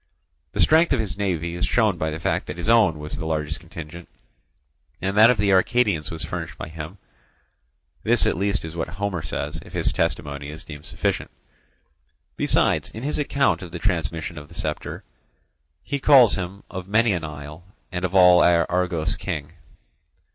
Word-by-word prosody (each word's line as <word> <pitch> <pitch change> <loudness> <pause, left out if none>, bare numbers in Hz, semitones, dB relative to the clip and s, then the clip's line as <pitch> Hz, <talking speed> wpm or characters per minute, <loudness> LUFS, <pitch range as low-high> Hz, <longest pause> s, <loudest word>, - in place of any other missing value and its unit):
The - - -5
strength 160 +2 +5
of 130 - +1
his 110 -3 -2
navy 85 -4 -2
is 85 - -1
shown 110 -7 +2
by 80 - 0
the 80 +1 -5
fact - - -1
that 75 - -6
his 85 - -5
own 110 -8 +4
was 75 0 -7
the - - -5
largest 80 -1 -2
contingent, 85 0 -10 0.9
and 95 +1 -2
that 110 +2 +8
of 125 - +3
the 100 0 +2
Arcadians 100 -4 +2
was 80 -1 -5
furnished - - -5
by - - -6
him; 80 +4 -8 1.0
this - - +3
at - - +2
least 100 0 -1
is 80 0 -8
what 80 - -2
Homer 95 0 -3
says, 75 0 -4
if - - -15
his - - 0
testimony 70 -1 -2
is 80 +3 -8
deemed 75 -3 -10
sufficient. - - -2 1.1
Besides, - - +2
in 110 - -8
his 150 +2 -1
account 140 -4 +1
of 90 -3 -8
the 85 - -5
transmission 85 -3 -2
of 75 - -12
the - - -15
sceptre, - - -4 0.8
he 140 0 -3
calls 135 -5 +7
him 95 +1 -4
Of 95 -1 -7
many 110 +1 +3
an 85 -3 -2
isle, 75 +1 -8 0.3
and 90 0 -4
of 90 +1 -2
all 90 -1 +7
Argos 85 +1 +2
king. 75 -8 -5
90 Hz, 180 wpm, -23 LUFS, 80-100 Hz, 1.1 s, that